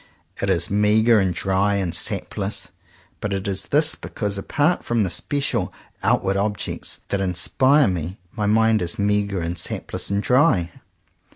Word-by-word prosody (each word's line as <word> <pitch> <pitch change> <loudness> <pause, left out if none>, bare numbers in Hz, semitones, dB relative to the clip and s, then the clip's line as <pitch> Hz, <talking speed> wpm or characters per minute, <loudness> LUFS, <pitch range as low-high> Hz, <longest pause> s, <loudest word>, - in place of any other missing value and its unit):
It - - 0
is - - 0
meagre 105 +2 +4
and 95 -2 +1
dry 95 +2 +1
and 95 -4 -1
sapless. 85 - -2 0.5
But 105 -1 -3
it 95 +1 -4
is 95 -1 -2
this 150 +2 +3
because, 105 -2 -4
apart 145 - 0
from 120 -2 +1
the 95 - -2
special 135 -9 -1 0.3
outward 100 0 +1
objects 105 -1 -3
that 100 - -1
inspire 130 - +3
me, 90 0 -3
my 105 -1 -2
mind 110 0 +3
is 85 -1 -1
meagre, 100 -2 0
and 85 +1 -3
sapless, - - -4
and 100 +1 0
dry. 125 - +3
100 Hz, 155 wpm, -22 LUFS, 95-110 Hz, 0.5 s, meagre